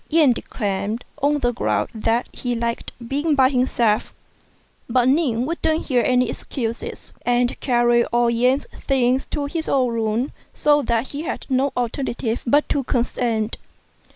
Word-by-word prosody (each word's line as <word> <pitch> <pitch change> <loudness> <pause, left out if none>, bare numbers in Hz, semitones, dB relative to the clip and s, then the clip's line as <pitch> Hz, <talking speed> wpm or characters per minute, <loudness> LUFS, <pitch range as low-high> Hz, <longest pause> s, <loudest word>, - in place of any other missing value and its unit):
Yen 310 -4 +5
declined, 210 0 -3 0.2
on 290 +2 +3
the 245 - +2
ground 235 - 0
that 225 +2 0
he 245 -1 -3
liked 235 0 -3 0.2
being 290 +4 +1
by 260 -1 +5
himself; 245 -5 +1 0.7
but 245 +1 +3
Ning 260 -4 +2
wouldn't 320 0 0
hear 250 -4 +2
any 250 0 +3
excuses, 230 -3 -5
and 245 0 +1
carried 240 -2 +3
all 240 0 +3
Yen's 250 +4 +2
things 260 -1 +1
to 290 -2 -2
his 320 +3 -3
own 255 -3 +2
room, 225 +4 -1 0.2
so 295 0 +3
that 235 -1 0
he 290 - -5
had 325 - -4
no 265 +1 +2
alternative 240 -1 -2
but 290 +5 +3
to 280 - 0
consent. 235 -3 -1
250 Hz, 150 wpm, -22 LUFS, 235-275 Hz, 0.7 s, Yen